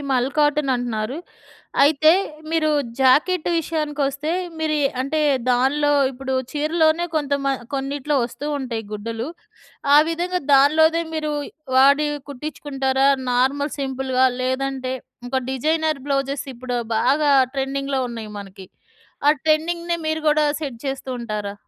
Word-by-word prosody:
మల్ 250 0 +2
కాటన్ 295 -1 +2
అంటున్నారు 240 +1 -3 0.7
అయితే, 310 +2 +5 0.4
మీరు 320 -1 +2 0.3
జాకెట్ 310 +7 +3
విషయానికొస్తే 300 -2 -2 0.3
మీరు 315 -1 0
ఎ - - +5 0.2
అంటే, 310 +4 -1 0.3
దాన్లో 285 +4 +2 0.2
ఇప్పుడు 265 +1 -4 0.2
చీరలోనే 315 +2 +2
కొంత 285 -2 -1
మ 275 - +1 0.3
కొన్నిట్లో 280 +1 -1
వస్తూ 280 +5 -6
ఉంటాయి 235 -5 -4
గుడ్డలు, 225 +5 -4 0.7
ఆ 295 - +9
విధంగా 355 +2 -1
దానిలోదె 315 +4 +5
మీరు 305 -1 -2 0.4
వాడి 280 +3 +5 0.2
కుట్టించుకుంటారా 270 -1 -1 0.2
నార్మల్ 270 +4 +1
సింపుల్‌గా? 265 -1 +1 0.2
లేదంటే, 260 0 -2 0.3
ఇంక 265 +2 -2
డిజైనర్ 310 +3 0
బ్లౌజెస్ 275 0 -1
ఇప్పుడు 245 +1 -4 0.2
బాగా 290 +3 +2 0.2
ట్రెండింగ్‌లో 275 0 -1
ఉన్నాయి 225 -2 -7
మనకి, 195 -1 -11 0.6
ఆ - - +9
ట్రెండింగ్‌నే 335 +2 +1
మీరు 315 0 -1
గూడా 300 0 +3
సెట్ 270 -6 -5
చేస్తూ 270 -1 -4
ఉంటారా? 210 -3 -4
275 Hz, 120 wpm, -22 LUFS, 260-310 Hz, 0.7 s, ఆ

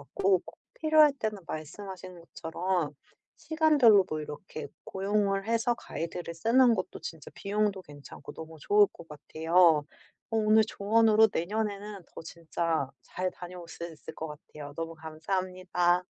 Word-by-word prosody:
같고 185 +7 +1
꼭 - - -13 0.2
필요할 310 -2 +5
때는 215 -3 -2
말씀하신 180 +3 -7
것처럼 170 0 -2 0.4
시간별로 295 - +5
뭐 155 - -3
이렇게 150 +4 -7 0.2
고용을 195 0 0
해서 230 +1 +2
가이드를 170 -4 -6
쓰는 235 +7 +4
것도 185 -2 -4
진짜 160 -3 -8
비용도 205 -1 -1
괜찮고 145 -3 -11
너무 160 0 -9
좋을 205 +4 +5
것 165 - -14
같아요. 160 +1 +3 0.5
어 225 - 0
오늘 215 0 +5
조언으로 220 +1 +4
내년에는 205 +1 -3
더 - - -8
진짜 165 -2 -2
잘 185 +8 -3
다녀올 175 -1 -10
수 170 - -7
있을 160 - -11
것 160 - -5
같아요. 150 -1 -10
너무 165 0 -4
감사합니다. 180 +2 -1
185 Hz, 310 characters per minute, -29 LUFS, 165-210 Hz, 0.5 s, 필요할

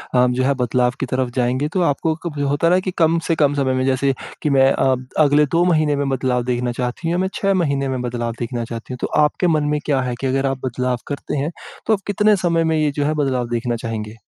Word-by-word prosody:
अ, 125 0 +5
जो 125 +1 0
है 140 - +3
बदलाव 125 +1 +1
की 135 - -1
तरफ 130 0 -1
जाएँगे, 130 +3 +1
तो 180 +3 -1
आपको 160 0 +1
कब 155 -4 -4
होता 145 +4 +1
है 175 - +4
ना 185 - +4
कि 185 0 -3
कम 165 0 +3
से 165 - +2
कम 145 -2 +2
समय 135 -2 +1
में 130 0 0
जैसे 135 +1 +1 0.3
कि 150 - 0
मैं 135 -1 +4
अ, 130 -1 +2 0.3
अगले 145 +1 +4
2 170 - +4
महीने 155 -4 +2
में 140 0 -1
बदलाव 130 -2 0
देखना 125 0 -1
चाहती 125 +6 -3
हूँ 165 - 0
या 175 - 0
मैं 190 - +1
6 195 0 +1
महीने 140 -3 0
में 130 -1 -2
बदलाव 120 -1 -3
देखना 120 0 -3
चाहती 115 +2 -7
हूँ। - - -6
तो - - 0
आपके 150 +4 +2
मन 155 -3 +2
में 150 - 0
क्या 140 -3 +1
है 125 -1 -2
कि 135 - 0
अगर 135 +1 0
आप 135 -1 0
बदलाव 125 0 -1
करते 145 0 -4
हैं, 145 +4 -1 0.4
तो 220 - +4
आप 200 - 0
कितने 210 +1 +3
समय 165 -1 +2
में 160 -1 +1
ये 150 -1 +1
जो 145 0 -2
है 155 - +1
बदलाव 130 -3 -1
देखना 120 0 -1
चाहेंगे? 110 -2 -5
135 Hz, 265 wpm, -20 LUFS, 125-155 Hz, 0.4 s, अ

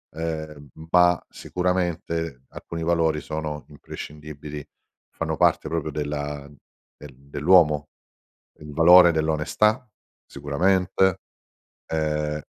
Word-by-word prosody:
ehm, 80 -3 -5 0.2
ma 90 -1 +5
sicuramente 85 -6 -2
alcuni 85 0 -8
valori 80 -2 +1
sono 75 -1 -5
imprescindibili, 75 0 -9 0.5
fanno - - -3
parte - - +2
proprio 80 -2 -3
della 75 -1 -4 0.5
del 75 -2 -12
dell'uomo. 75 +2 +2 0.7
Il 75 0 -10
valore 85 +3 +7
dell'onestà 80 +10 +1 0.4
sicuramente, 95 +6 +1 0.7
ehm, 75 -1 -2
80 Hz, 85 wpm, -24 LUFS, 75-85 Hz, 0.7 s, valore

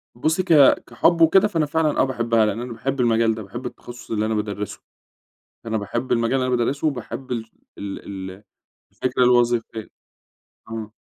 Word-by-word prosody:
بُصّي، 160 +8 0
ك 175 -3 +2 0.3
كحب 165 +8 +2
وكده، 190 +5 +6
فأنا 165 -6 0
فعلًا 155 0 0
آه - - +5
باحبها 115 -4 +1
لإن 110 +2 -2
أنا 120 -1 -6
باحب 135 +3 -3
المجال 115 -2 +2
ده، 110 - -7
باحب 120 +6 -8
التخصُّص 120 -1 -9
اللي 110 -1 0
أنا 110 - -1
بادَرِّسه. 105 -1 -4 0.9
أنا 110 0 -1
باحب 120 +5 -3
المجال 115 +1 +1
اللي 130 - 0
أنا 125 -1 +1
بادَرِّسه 140 +6 -1
وباحب 125 -1 -4
ال 115 -1 -4 0.3
ال 100 -1 -6 0.3
ال 95 +3 -13 0.5
الفكرة 125 0 0
الوظيفية. 120 -2 +2 0.8
آه. 110 -1 -6
120 Hz, 170 wpm, -22 LUFS, 110-135 Hz, 0.9 s, وكده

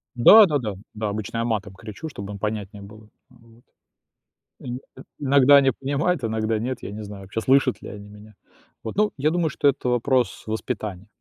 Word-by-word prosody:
Да. 205 - +9
Да-да. 125 - -2 0.2
Да. 105 -1 -3
Обычно 105 +2 -4
я 115 - 0
матом 105 -4 -2
кричу, 110 - -9
чтобы 100 -6 -8
им 100 - -8
понятнее 105 -1 -4
было. 105 +1 -14 0.2
Вот. 115 -2 -22 1.0
Ин 125 0 -6 0.2
э, 130 - -12 0.2
иногда 140 0 +5
они 135 -1 +5
понимают, 140 +4 -1
иногда 110 0 -1
нет, 125 +2 -4
я - - -6
не 105 +1 -7
знаю, 100 -1 -9
вообще, 110 +4 -4
слышат 130 +1 +2
ли - - -8
они 105 0 -10
меня. 105 0 -15 0.5
Вот. 110 - -6
Ну, 210 +1 +2
я 150 +3 +1
думаю, 170 -2 0
что 145 - 0
это 135 -2 +1
вопрос 125 +1 0
воспитания. 110 -3 -4
115 Hz, 185 wpm, -23 LUFS, 105-135 Hz, 1.0 s, Да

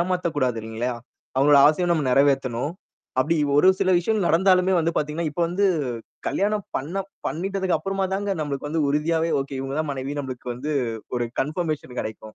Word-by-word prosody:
ஏமாத்தக்கூடாது 170 -9 0
இல்லேங்களேயா! 115 +3 -3 0.4
அவுங்களோட 140 +1 +6
ஆசைய 165 +4 +1
நம்ம 155 -3 0
நிறைவேத்தணும். 135 0 +2 0.5
அப்பிடி 155 +6 +2 0.2
ஒரு 185 - +6
சில 185 - +3
விஷயங்கள் 205 0 0
நடந்தாலுமே 185 +2 +4
வந்து 165 +1 +1
பார்த்தீங்கன்னா, 150 +2 -1
இப்ப 170 +4 -2
வந்து 200 +3 +1 0.6
கல்யாணம் 205 +1 0
பண்ண 175 +9 -3 0.3
பண்ணிட்டதுக்கு 190 0 -1
அப்புறமா 195 +3 -1
தாங்க 200 +1 -2
நம்மளுக்கு 145 -1 -3
வந்து 160 -1 +1
உறுதியாவே 160 +3 +1
ஓகே. 135 -1 -5
இவுங்க 135 +2 -4
தான் 155 - -2
மனைவி 135 +1 -4
நம்மளுக்கு 130 -2 -7
வந்து 145 +6 -4 0.4
ஒரு 120 -1 0
கன்ஃபர்மேஷன் 150 -3 -3
கிடைக்கும். 110 0 -7
155 Hz, 155 wpm, -24 LUFS, 135-180 Hz, 0.6 s, அவுங்களோட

